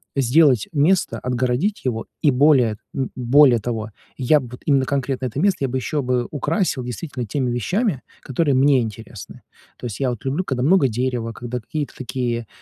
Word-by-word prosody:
сделать 135 Hz, -2 st, +4 dB
место, 160 Hz, +5 st, +2 dB
отгородить 125 Hz, -, -1 dB
его 115 Hz, -3 st, -2 dB, 0.2 s
и 150 Hz, -, +4 dB
более, 125 Hz, -5 st, +4 dB, 0.2 s
м, 135 Hz, -2 st, -2 dB
более 130 Hz, 0 st, +5 dB
того, 110 Hz, -1 st, -4 dB, 0.3 s
я 140 Hz, +4 st, +3 dB
б 130 Hz, -, -8 dB
вот 125 Hz, -, -10 dB
именно 140 Hz, -3 st, +3 dB
конкретно 135 Hz, -1 st, -2 dB
это 125 Hz, +3 st, -5 dB
место 195 Hz, +2 st, +2 dB
я 135 Hz, -, 0 dB
бы 130 Hz, -, -2 dB
ещё 145 Hz, +3 st, -2 dB
бы 125 Hz, -2 st, -1 dB
украсил 150 Hz, -1 st, -1 dB
действительно 125 Hz, +1 st, -5 dB
теми 125 Hz, +3 st, -2 dB
вещами, 170 Hz, -, -1 dB, 0.2 s
которые 140 Hz, +1 st, 0 dB
мне 135 Hz, 0 st, +4 dB
интересны. 110 Hz, -1 st, -8 dB, 0.3 s
То -, -, -9 dB
есть 110 Hz, -5 st, -5 dB
я 135 Hz, -, +1 dB
вот 120 Hz, -1 st, -6 dB
люблю, 140 Hz, +7 st, -1 dB
когда 130 Hz, -7 st, -2 dB
много 160 Hz, -1 st, +4 dB
дерева, 120 Hz, 0 st, -2 dB
когда 120 Hz, +1 st, -5 dB
какие-то 150 Hz, +5 st, -5 dB
такие, 120 Hz, -3 st, -3 dB
130 Hz, 180 wpm, -21 LUFS, 120-145 Hz, 0.3 s, более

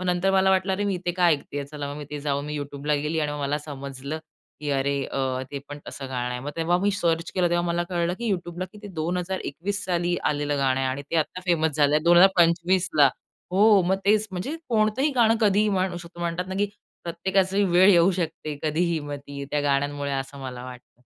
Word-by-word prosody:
मग 185 Hz, -, -4 dB
नंतर 180 Hz, +2 st, +2 dB
मला 190 Hz, 0 st, +4 dB
वाटलं, 190 Hz, 0 st, +2 dB
अरे! 205 Hz, +2 st, -1 dB
मी 200 Hz, -, 0 dB
इथे 175 Hz, -1 st, -2 dB
का 180 Hz, -1 st, +2 dB
ऐकते 145 Hz, -3 st, 0 dB
आहे? 140 Hz, -, -4 dB
चला, 145 Hz, -1 st, -6 dB
मग 145 Hz, -, -7 dB
मी 145 Hz, -, -6 dB
तिथे 150 Hz, 0 st, -7 dB
जाऊन 140 Hz, -1 st, -1 dB
मी 150 Hz, 0 st, -4 dB
YouTubeला 145 Hz, +1 st, -2 dB
गेली 155 Hz, +1 st, -1 dB
आणि 150 Hz, -1 st, -1 dB
मग 150 Hz, -, -5 dB
मला 145 Hz, +1 st, 0 dB
समजलं 140 Hz, 0 st, -6 dB, 0.4 s
की, 145 Hz, -1 st, -3 dB
अरे! 140 Hz, 0 st, 0 dB, 0.5 s
ते 140 Hz, -, -4 dB
पण 145 Hz, 0 st, -7 dB
असं 135 Hz, -, -7 dB
गाणं 125 Hz, -1 st, -2 dB
आहे. 125 Hz, 0 st, -4 dB
मग 145 Hz, -, -5 dB
तेव्हा 170 Hz, +2 st, +2 dB
मी 200 Hz, +2 st, +2 dB
सर्च 170 Hz, -4 st, 0 dB
केलं 180 Hz, -2 st, +2 dB
तेव्हा 175 Hz, 0 st, +1 dB
मला 170 Hz, 0 st, 0 dB
कळलं 175 Hz, -1 st, 0 dB
की 235 Hz, -2 st, -2 dB
YouTubeला 175 Hz, 0 st, -4 dB
किती 210 Hz, -1 st, -10 dB
2021 180 Hz, +3 st, -3 dB
साली 175 Hz, -1 st, 0 dB
आलेलं 145 Hz, -1 st, -1 dB
गाणं 135 Hz, -1 st, +2 dB
आहे 130 Hz, -, 0 dB
आणि 135 Hz, +2 st, -3 dB
ते 165 Hz, -, 0 dB
आता 165 Hz, +3 st, -1 dB
फेमस 160 Hz, -4 st, +2 dB
झालं 150 Hz, +1 st, +3 dB
2025ला. 175 Hz, -2 st, +5 dB, 0.4 s
हो, 205 Hz, 0 st, +6 dB
मग 190 Hz, +1 st, +2 dB
तेच, 215 Hz, +1 st, +3 dB
म्हणजे 190 Hz, -, -4 dB
कोणतंही 225 Hz, +6 st, +2 dB
गाणं 230 Hz, -2 st, +5 dB
कधीही 210 Hz, 0 st, +3 dB
म्हणू 185 Hz, -2 st, 0 dB
शकता. 170 Hz, 0 st, -10 dB
म्हणतात 170 Hz, +1 st, -2 dB
ना 190 Hz, -, -4 dB
की 205 Hz, -, +2 dB, 0.4 s
प्रत्येकाचा 190 Hz, +3 st, 0 dB
वेळ 185 Hz, +3 st, +6 dB
येऊ 175 Hz, +1 st, +5 dB
शकते 160 Hz, -3 st, -3 dB
कधीही, 165 Hz, +2 st, +1 dB
मग 145 Hz, 0 st, -5 dB
ती 140 Hz, 0 st, -6 dB
त्या 150 Hz, -, +1 dB
गाण्यांमुळे 145 Hz, 0 st, 0 dB
असं 135 Hz, +1 st, -4 dB
मला 125 Hz, -2 st, -6 dB
वाटतं. 125 Hz, -1 st, -12 dB
170 Hz, 215 wpm, -25 LUFS, 145-185 Hz, 0.5 s, हो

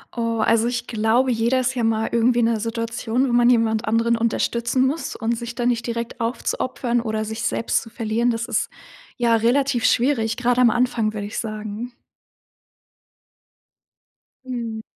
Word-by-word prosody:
Oh, 230 Hz, -1 st, -1 dB
also, 230 Hz, +1 st, +3 dB
ich 245 Hz, 0 st, -2 dB
glaube, 230 Hz, +3 st, +1 dB
jeder 235 Hz, +3 st, +1 dB
ist 255 Hz, 0 st, 0 dB
ja 245 Hz, -, -2 dB
mal 225 Hz, 0 st, +1 dB
irgendwie 235 Hz, +1 st, +3 dB
in 230 Hz, -, +3 dB
'ner 230 Hz, -1 st, +1 dB
Situation, 230 Hz, +3 st, -1 dB
wo 240 Hz, -, -1 dB
man 240 Hz, 0 st, +5 dB
jemand 225 Hz, -2 st, +2 dB
anderen 230 Hz, +2 st, +2 dB
unterstützen 235 Hz, +2 st, 0 dB
muss 295 Hz, +5 st, -2 dB
und 230 Hz, 0 st, -1 dB
sich 235 Hz, +1 st, -6 dB
dann 245 Hz, 0 st, +1 dB
nicht 240 Hz, 0 st, -1 dB
direkt 235 Hz, +1 st, -4 dB
aufzuopfern 240 Hz, +1 st, -1 dB
oder 220 Hz, -1 st, -2 dB
sich 220 Hz, +1 st, -5 dB
selbst 230 Hz, -, 0 dB
zu 225 Hz, -, -11 dB
verlieren, 230 Hz, +1 st, -1 dB
das 230 Hz, -1 st, -1 dB
ist, 230 Hz, -3 st, -1 dB, 0.5 s
ja, 235 Hz, -1 st, +3 dB
relativ 245 Hz, +2 st, +1 dB
schwierig, 230 Hz, -3 st, +2 dB
gerade 245 Hz, 0 st, +2 dB
am 240 Hz, -, +6 dB
Anfang, 235 Hz, -2 st, 0 dB
würde 205 Hz, -1 st, -4 dB
ich 210 Hz, -, -5 dB
sagen. 215 Hz, +2 st, -5 dB, 2.5 s
Mhm. 235 Hz, -3 st, -4 dB
235 Hz, 165 wpm, -22 LUFS, 225-245 Hz, 2.5 s, am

